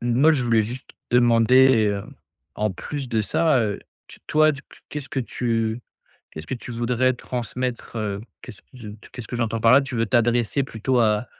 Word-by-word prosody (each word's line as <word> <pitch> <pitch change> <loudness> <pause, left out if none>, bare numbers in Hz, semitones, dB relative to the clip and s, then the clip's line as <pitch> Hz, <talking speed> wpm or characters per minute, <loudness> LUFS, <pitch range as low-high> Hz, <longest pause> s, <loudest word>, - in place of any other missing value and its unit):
Moi, 120 +6 +3
je 135 -5 0
voulais 115 -2 +3
juste 125 +4 -7 0.2
demander, 120 0 +5
heu, 100 -1 -3 0.5
en 105 0 -1
plus 135 +7 -6
de 115 -2 0
ça, 140 - +2
heu, 105 -3 -1 0.5
toi, 155 0 +4 0.4
qu'est-ce 145 -2 -6
que 135 -4 -2
tu 115 -1 -2 0.5
qu'est-ce 80 0 -9
que - - -3
tu 120 0 -9
voudrais 120 +2 +1
transmettre, 125 0 -5
heu, 100 -2 -3 0.2
qu'est-ce 100 - -12
que - - -48
je 115 -4 -10 0.2
qu'est-ce 120 -3 -8
que 120 - -4
j'entends 115 -1 -1
par 115 +1 +5
là, 140 - +7
tu 135 -1 -6
veux 115 0 +1
t'adresser 120 +3 +1
plutôt 125 0 -1
à 105 0 +1
120 Hz, 180 wpm, -23 LUFS, 110-130 Hz, 0.5 s, là